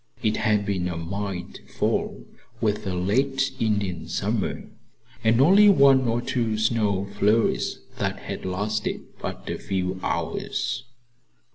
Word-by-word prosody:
It 110 -1 +2
had 105 -1 +2
been 95 -3 -1
a 85 -2 -3
mild 95 +2 -5 0.2
fall, - - -1 0.3
with 105 -2 0
a 95 - -1
late 130 +9 +1
Indian 100 -6 -1
summer, - - -1 0.6
and 115 +1 +4
only 195 +9 +7
one 135 -8 +6
or 115 +1 0
two 115 -4 0
snow 105 -3 +1
flurries 110 +3 +2 0.2
that - - -1
had - - -6
lasted 105 +4 -2 0.2
but - - -6
a - - -3
few 95 -1 -2
hours. 130 -1 -2
105 Hz, 130 wpm, -25 LUFS, 95-120 Hz, 0.6 s, only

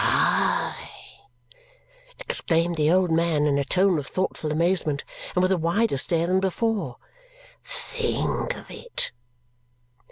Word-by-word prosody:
"Hi!" - - 0 1.0
exclaimed 170 - 0
the 155 0 +2
old 180 -1 +3
man 160 -2 +2
in 140 -1 +2
a - - +1
tone 185 +3 +2
of 140 - -6
thoughtful 185 -4 -2
amazement 160 -2 +1 0.3
and 180 - +3
with 185 - +2
a 190 - +2
wider 175 +5 +1
stare 165 +4 +2
than 185 +2 +2
before. 210 +3 -1 0.7
"Think - - -2
of - - -12
it!" 485 - -3
175 Hz, 125 wpm, -25 LUFS, 160-195 Hz, 1.0 s, old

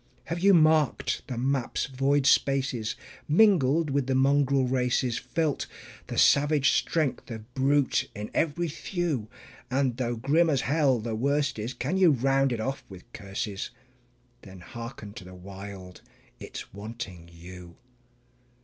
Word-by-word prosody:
Have 170 +2 -4
you 195 +1 +5
marked 155 -3 +3
the 125 - -5
map's 130 0 -1
void 135 +1 +1
spaces, 135 -5 +2 0.3
mingled 160 -4 +4
with 140 -1 0
the 135 - +1
mongrel 135 0 +3
races, 125 -1 0
Felt 155 -3 -2 0.4
the - - -5
savage 145 0 +4
strength 155 -5 -1
of 115 +1 -9
brute 140 +1 +1
in 105 +1 -6
every 170 +2 0
thew? 160 - -3 0.4
And 130 -2 0
though 120 -2 -1
grim 150 +8 +2
as 140 -4 +1
hell 140 -3 +2
the 110 +1 -4
worst 140 +3 0
is, 115 +4 -4
can 185 - -2
you 185 -3 +6
round 135 0 +2
it 120 - -2
off 135 +5 -3
with 95 -2 -13
curses? 100 +1 -5 0.7
Then 95 -3 -12
hearken 115 0 -9
to 115 - -9
the 90 0 -12
Wild 95 0 -10 0.4
it's - - -9
wanting 100 -5 -8
you. 85 +1 -12
130 Hz, 140 wpm, -27 LUFS, 110-145 Hz, 0.7 s, you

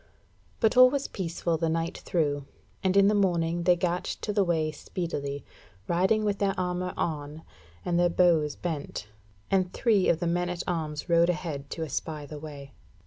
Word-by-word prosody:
But 220 0 +3
all 255 0 +9
was 280 +1 -2
peaceful 170 -2 -2
the 165 -1 +1
night 165 +1 -2
through, 145 -5 -1 0.4
and 190 +1 +2
in 200 0 +7
the 210 - +4
morning 175 -4 +1
they 180 - +6
gat 175 0 -1 0.2
to 210 - -2
the 200 -1 +3
way 160 -3 +1
speedily, 145 -3 -4 0.4
riding 190 +5 +2
with 205 -1 0
their 195 -1 +1
armour 180 0 -2
on, 150 -1 -3 0.4
and 175 0 +1
their 175 0 +4
bows 170 -4 +3
bent: 145 -10 -5 0.4
and 185 -2 +2
three 215 -6 +3
of 165 - +3
the 175 - -2
men 175 +1 0
at 180 0 -3
arms 155 -4 -3
rode 170 0 +4
ahead 150 -5 -3
to 165 - -4
espy 155 0 -4
the 150 +1 -8
way. 145 -2 -9
170 Hz, 180 wpm, -28 LUFS, 155-185 Hz, 0.4 s, all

